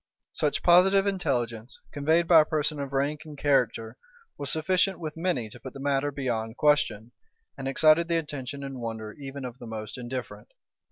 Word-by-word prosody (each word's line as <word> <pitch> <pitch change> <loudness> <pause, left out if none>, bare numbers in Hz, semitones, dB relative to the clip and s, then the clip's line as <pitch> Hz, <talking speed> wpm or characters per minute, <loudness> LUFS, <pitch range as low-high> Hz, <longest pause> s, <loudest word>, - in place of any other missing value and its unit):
Such 150 -2 -1
positive 190 +3 +6
intelligence, 125 - -2
conveyed 160 +4 +2
by 165 -2 +8
a - - 0
person 150 -1 -1
of 140 -1 -4
rank 140 +2 -1
and 150 -2 -11
character, 125 -5 +1 0.4
was 140 - -2
sufficient 185 +4 +1
with 155 -3 -5
many 165 -9 -1
to 120 - -13
put 130 +1 -9
the 135 - -9
matter 140 +1 0
beyond 120 -5 -3
question, 135 -7 +2 0.4
and 135 -1 -5
excited 155 +4 +4
the 170 -1 +1
attention 145 -3 -5
and 135 -2 -6
wonder 110 -2 -5
even 140 -1 -8
of 125 0 -8
the 120 - -9
most 110 +1 -6
indifferent. 120 -4 -7
140 Hz, 175 wpm, -27 LUFS, 120-155 Hz, 0.4 s, by